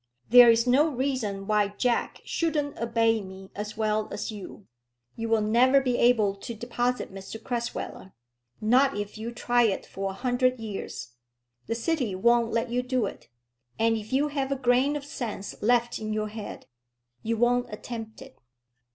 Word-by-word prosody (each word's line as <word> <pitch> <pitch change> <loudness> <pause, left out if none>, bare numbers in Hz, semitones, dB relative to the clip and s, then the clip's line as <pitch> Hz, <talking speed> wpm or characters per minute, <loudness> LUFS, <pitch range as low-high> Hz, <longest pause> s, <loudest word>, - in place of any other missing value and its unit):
There 245 -1 +10
is 230 +1 +4
no 265 +5 +4
reason 250 -8 -2
why 205 -1 +1
Jack 245 -2 0
shouldn't 300 -4 -1
obey 225 -1 +2
me 190 0 -11
as 210 +1 -6
well 215 -1 0
as - - -4
you. 205 -1 -9 0.5
You 230 0 -4
will 225 -1 +3
never 250 +5 +5
be 250 -2 0
able 225 -5 +4
to 235 +3 -7
deposit 240 0 -2
Mr 195 +3 -8
Crasweller, 235 -5 -4 0.5
not 255 +4 +3
if 205 +1 -5
you 230 +2 -4
try 240 0 +1
it 220 -5 +1
for 195 +1 -4
a - - -5
hundred 250 +2 +1
years. 210 - -6 0.6
The 230 - -1
city 240 - -1
won't 235 +3 +3
let 230 +1 -1
you 245 +1 +1
do 250 -2 0
it; - - -8 0.5
and 225 0 +3
if 220 +1 -6
you 280 +3 +2
have 275 -2 -2
a - - +2
grain 260 +2 +2
of 290 -1 -5
sense 220 -8 -5
left 240 +2 +2
in 215 -1 -3
your 215 0 -2
head, 215 -1 -8 0.6
you 230 +1 -1
won't 245 +1 +2
attempt 225 +2 -7
it. 265 -1 -17
230 Hz, 170 wpm, -27 LUFS, 215-250 Hz, 0.6 s, There